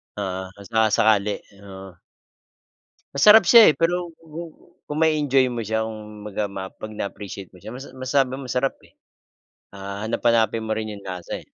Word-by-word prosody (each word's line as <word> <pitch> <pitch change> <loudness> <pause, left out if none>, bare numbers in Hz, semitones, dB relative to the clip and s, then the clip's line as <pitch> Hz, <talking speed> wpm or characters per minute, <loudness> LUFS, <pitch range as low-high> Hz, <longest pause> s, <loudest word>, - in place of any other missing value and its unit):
Oo, 95 -2 -4
kung 100 -1 -13
saka-sakali. 110 -2 +3 0.3
Oo. 95 -2 -11 1.2
Masarap 210 +8 +8
siya, 230 -8 +9
eh. - - -6
Pero 175 +1 0
ku 160 0 -10 0.5
kung 150 +1 -3
ma-e-enjoy 145 -4 +3
mo 120 - -4
siya, 110 +1 -1
kumbaga 105 -1 -5
ma 95 -1 -6
'pag 110 - -9
na-appreciate 100 -2 -7
mo 90 - -17
siya 110 - -9
mas 135 +2 -9
masabi 130 0 0
mo 135 -1 -8
masarap, 125 +3 0
eh. - - -22 0.8
Ah, 100 +1 -6
hahanap-hanapin 115 -1 +1
mo - - -5
rin 110 0 -4
yung 100 - -11
lasa, 90 -2 -5
eh. - - -20
110 Hz, 160 wpm, -23 LUFS, 100-135 Hz, 1.2 s, siya